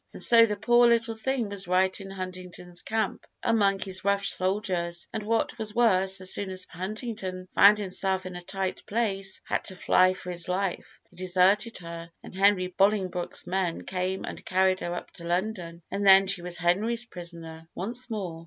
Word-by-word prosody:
And -, -, -4 dB
so 230 Hz, -1 st, +7 dB
the 210 Hz, -, -2 dB
poor 240 Hz, +4 st, +4 dB
little 230 Hz, -1 st, +2 dB
thing 235 Hz, 0 st, -2 dB
was 200 Hz, -2 st, -4 dB
right 185 Hz, +2 st, +1 dB
in 195 Hz, -, -9 dB
Huntington's 185 Hz, -2 st, -8 dB
camp, 220 Hz, 0 st, -2 dB, 0.2 s
among 200 Hz, -4 st, +2 dB
his 190 Hz, -1 st, -3 dB
rough 200 Hz, 0 st, +1 dB
soldiers; 185 Hz, -3 st, -1 dB
and 220 Hz, -, -3 dB
what 225 Hz, +2 st, -1 dB
was 215 Hz, 0 st, -1 dB
worse, 195 Hz, -5 st, +3 dB
as 185 Hz, -, +5 dB
soon 200 Hz, -1 st, -2 dB
as 185 Hz, -1 st, +1 dB
Huntington 190 Hz, -1 st, -5 dB
found 205 Hz, +1 st, +7 dB
himself 190 Hz, -1 st, -1 dB
in 185 Hz, -1 st, -7 dB
a 175 Hz, -, -6 dB
tight 190 Hz, +1 st, -4 dB
place, 195 Hz, -3 st, -1 dB
and -, -, -7 dB
had -, -, -15 dB
to 190 Hz, -, -2 dB
fly 185 Hz, 0 st, +3 dB
for 180 Hz, -1 st, -7 dB
his 175 Hz, +1 st, -3 dB
life, 185 Hz, 0 st, -3 dB
he -, -, -22 dB
deserted 185 Hz, +5 st, +2 dB
her, 170 Hz, -1 st, -8 dB
and -, -, -11 dB
Henry 195 Hz, -1 st, +3 dB
Bolingbroke's 185 Hz, -1 st, 0 dB
men 180 Hz, -2 st, -2 dB
came 185 Hz, 0 st, -3 dB
and -, -, -8 dB
carried 185 Hz, 0 st, +2 dB
her 175 Hz, 0 st, -4 dB
up -, -, -7 dB
to 170 Hz, -, -13 dB
London, 175 Hz, -1 st, -3 dB
and 200 Hz, -, -2 dB
then 195 Hz, 0 st, +7 dB
she 190 Hz, -2 st, -2 dB
was 175 Hz, 0 st, -2 dB
Henry's 215 Hz, +7 st, +1 dB
prisoner 165 Hz, -4 st, -8 dB
once 240 Hz, +7 st, -3 dB
more. 190 Hz, -7 st, -4 dB
190 Hz, 190 wpm, -27 LUFS, 180-210 Hz, 0.2 s, so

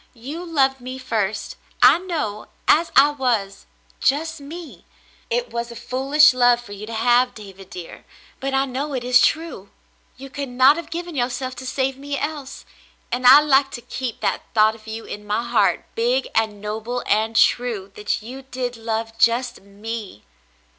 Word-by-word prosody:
You 280 Hz, +9 st, -7 dB
loved 270 Hz, -6 st, +1 dB
me 255 Hz, +1 st, -6 dB
first, 220 Hz, -5 st, -3 dB, 0.3 s
I 265 Hz, +7 st, +7 dB
know, 305 Hz, -, -4 dB, 0.2 s
as 330 Hz, +2 st, +4 dB
I 290 Hz, +1 st, +7 dB
was 235 Hz, -8 st, -2 dB, 0.2 s
— -, -, -33 dB
just 320 Hz, +3 st, -5 dB
me. 320 Hz, +3 st, -10 dB, 0.5 s
It 485 Hz, +1 st, -1 dB
was 235 Hz, 0 st, -3 dB
a 235 Hz, -, -9 dB
foolish 275 Hz, +5 st, +4 dB
love 245 Hz, -1 st, +4 dB
for 240 Hz, -4 st, -13 dB
you 205 Hz, +1 st, -8 dB
to 230 Hz, -, -7 dB
have, 245 Hz, +2 st, +3 dB
David 195 Hz, -3 st, -12 dB
dear, 175 Hz, -2 st, -9 dB, 0.2 s
— -, -, -27 dB
but 270 Hz, +1 st, -3 dB
I 270 Hz, 0 st, +2 dB
know 275 Hz, +2 st, -4 dB
it 250 Hz, -, -3 dB
is 250 Hz, -1 st, +5 dB
true; 315 Hz, -, -1 dB, 0.5 s
you 270 Hz, +1 st, -10 dB
could 280 Hz, -1 st, -5 dB
not 260 Hz, +3 st, +5 dB
have 335 Hz, -, -7 dB
given 345 Hz, +1 st, -5 dB
yourself 255 Hz, 0 st, -2 dB
to 260 Hz, -, -7 dB
save 265 Hz, 0 st, -1 dB
me 285 Hz, 0 st, -4 dB
else, 290 Hz, -2 st, -5 dB, 0.5 s
and 250 Hz, 0 st, +1 dB
I 275 Hz, +4 st, +10 dB
like 275 Hz, -2 st, +3 dB
to -, -, -12 dB
keep 250 Hz, -1 st, -5 dB
that -, -, 0 dB
thought 215 Hz, 0 st, +5 dB
of 220 Hz, 0 st, -16 dB
you 220 Hz, +1 st, -6 dB
in 210 Hz, -, -7 dB
my 210 Hz, +3 st, -1 dB
heart, -, -, +1 dB
big 485 Hz, +2 st, +1 dB
and 220 Hz, -2 st, 0 dB
noble 220 Hz, +4 st, -4 dB
and 220 Hz, +2 st, +1 dB
true 220 Hz, -5 st, +2 dB
— -, -, -36 dB
that 210 Hz, 0 st, -2 dB
you 255 Hz, +4 st, -8 dB
did 255 Hz, -2 st, -5 dB
love 225 Hz, 0 st, -3 dB
just 240 Hz, +2 st, +2 dB
me." 205 Hz, -, -8 dB
250 Hz, 185 wpm, -22 LUFS, 225-280 Hz, 0.5 s, I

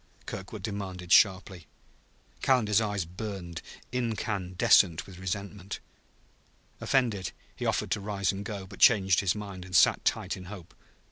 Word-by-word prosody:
Kirkwood 95 Hz, +1 st, -7 dB
demanded 95 Hz, -4 st, -5 dB
sharply. 95 Hz, -5 st, +4 dB, 0.7 s
Calendar's 115 Hz, -5 st, +3 dB
eyes 105 Hz, -5 st, -1 dB
burned, 90 Hz, -2 st, -6 dB, 0.3 s
incandescent 100 Hz, -7 st, +2 dB
with 90 Hz, -2 st, -12 dB
resentment. 100 Hz, +1 st, -5 dB, 1.0 s
Offended, 115 Hz, -9 st, 0 dB, 0.2 s
he -, -, -3 dB
offered -, -, -1 dB
to -, -, +1 dB
rise 100 Hz, -2 st, -1 dB
and 100 Hz, +1 st, -6 dB
go, 100 Hz, -3 st, -6 dB
but 100 Hz, +1 st, -13 dB
changed 95 Hz, -5 st, +5 dB
his 95 Hz, -1 st, +1 dB
mind 100 Hz, -3 st, -7 dB
and 90 Hz, 0 st, -6 dB
sat -, -, +5 dB
tight -, -, 0 dB
in 90 Hz, -, -10 dB
hope. 90 Hz, -3 st, -10 dB
100 Hz, 135 wpm, -29 LUFS, 90-105 Hz, 1.0 s, changed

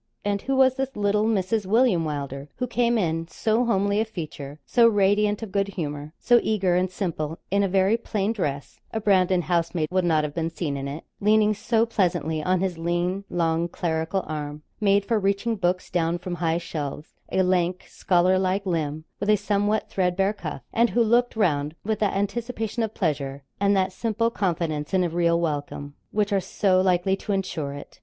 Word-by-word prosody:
And 200 Hz, -1 st, 0 dB
who 270 Hz, -, -1 dB
was 260 Hz, 0 st, +4 dB
this 270 Hz, 0 st, -2 dB
little 210 Hz, +1 st, +1 dB
Mrs. 210 Hz, -1 st, 0 dB
William 220 Hz, -5 st, +3 dB
Wylder 140 Hz, -2 st, -4 dB
who 250 Hz, -, -2 dB
came 240 Hz, -1 st, +1 dB
in, 165 Hz, -4 st, -1 dB
so 225 Hz, +6 st, 0 dB
homely 200 Hz, -1 st, +2 dB
of 220 Hz, -, -2 dB
feature, 155 Hz, -7 st, -7 dB
so 235 Hz, -2 st, +5 dB
radiant 205 Hz, 0 st, +2 dB
of 215 Hz, -, -7 dB
goodhumour, 160 Hz, -7 st, -3 dB
so 240 Hz, 0 st, +4 dB
eager 195 Hz, -5 st, +1 dB
and 185 Hz, +1 st, +1 dB
simple, 165 Hz, -4 st, -3 dB
in 200 Hz, +1 st, +3 dB
a 200 Hz, -, +2 dB
very 195 Hz, +3 st, +3 dB
plain 215 Hz, -2 st, -1 dB
dress 145 Hz, -9 st, -4 dB
a 220 Hz, -, -2 dB
Brandon 185 Hz, -3 st, +3 dB
housemaid 165 Hz, -1 st, 0 dB
would 185 Hz, 0 st, +2 dB
not 160 Hz, -3 st, +2 dB
have 150 Hz, -1 st, -3 dB
been 165 Hz, 0 st, -1 dB
seen 165 Hz, -3 st, -3 dB
in 140 Hz, 0 st, -4 dB
it, 145 Hz, +4 st, -6 dB, 0.2 s
leaning 215 Hz, +1 st, +4 dB
so 225 Hz, +2 st, +1 dB
pleasantly 175 Hz, -8 st, 0 dB
on 185 Hz, +3 st, +1 dB
his 185 Hz, -3 st, -2 dB
lean, 175 Hz, +3 st, -1 dB
long, 165 Hz, -1 st, 0 dB
clerical 165 Hz, +2 st, -2 dB
arm 150 Hz, -1 st, -5 dB, 0.2 s
made 200 Hz, -1 st, +3 dB
for 225 Hz, 0 st, +1 dB
reaching 200 Hz, +4 st, 0 dB
books 180 Hz, -2 st, -1 dB
down 170 Hz, -1 st, +1 dB
from 180 Hz, 0 st, -6 dB
high 165 Hz, -1 st, 0 dB
shelves, 150 Hz, -3 st, -5 dB, 0.2 s
a 190 Hz, -, +2 dB
lank, 180 Hz, 0 st, +1 dB
scholarlike 185 Hz, +2 st, +1 dB
limb, 155 Hz, -3 st, -2 dB
with 205 Hz, -, -2 dB
a 215 Hz, -, +6 dB
somewhat 205 Hz, +1 st, 0 dB
threadbare 190 Hz, +2 st, +1 dB
cuff 155 Hz, -, -6 dB
and 235 Hz, +1 st, +3 dB
who 235 Hz, -, +2 dB
looked 240 Hz, +2 st, +2 dB
round 155 Hz, -7 st, +1 dB
with 215 Hz, 0 st, -1 dB
that 210 Hz, -3 st, +1 dB
anticipation 225 Hz, +3 st, -2 dB
of 220 Hz, -1 st, -2 dB
pleasure, 140 Hz, -6 st, -2 dB, 0.2 s
and 200 Hz, 0 st, +3 dB
that 190 Hz, 0 st, +1 dB
simple 230 Hz, +3 st, 0 dB
confidence 165 Hz, -5 st, -1 dB
in 185 Hz, -, +3 dB
a 175 Hz, -, 0 dB
real 170 Hz, 0 st, +2 dB
welcome, 145 Hz, -3 st, -3 dB, 0.2 s
which 205 Hz, 0 st, 0 dB
are 195 Hz, -, +3 dB
so 185 Hz, 0 st, +2 dB
likely 185 Hz, +1 st, +2 dB
to 205 Hz, -, -5 dB
insure 170 Hz, -7 st, -2 dB
it? 145 Hz, -, -11 dB
185 Hz, 190 wpm, -25 LUFS, 165-210 Hz, 0.2 s, a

